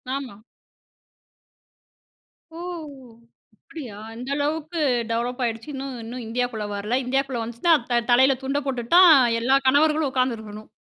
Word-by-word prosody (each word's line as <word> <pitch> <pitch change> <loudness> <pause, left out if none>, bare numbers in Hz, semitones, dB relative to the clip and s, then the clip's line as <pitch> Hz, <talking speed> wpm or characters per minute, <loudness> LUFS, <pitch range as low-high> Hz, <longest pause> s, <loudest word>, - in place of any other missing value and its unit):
ஆமா. 255 -8 -6 2.2
ஓ! - - -8 1.0
அப்டியா? 245 -2 -10 0.2
அந்த 245 +4 -8
அளவுக்கு 310 +3 -2 0.3
டெவலப் 240 +2 -2
ஆயிடுச்சு. 225 +3 -4
இன்னும் 270 -1 -5
இன்னும் 240 +2 -7
இந்தியாக்குள்ள 230 -2 -2
வரல. 210 +5 -1
இந்தியாக்குள்ள 265 -1 -1
வந்துச்சுன்னா 235 +9 +1 0.2
த 240 0 +3
தலையில 260 +2 +5
துண்ட 275 +2 -1
போட்டுட்டு 245 0 -3
தான் 360 -2 +9 0.3
எல்லா 260 +4 +3
கணவர்களும் 300 +1 +3
உட்கார்ந்து 255 -3 0
இருக்கணும். 215 0 -11
255 Hz, 120 wpm, -23 LUFS, 230-275 Hz, 2.2 s, தான்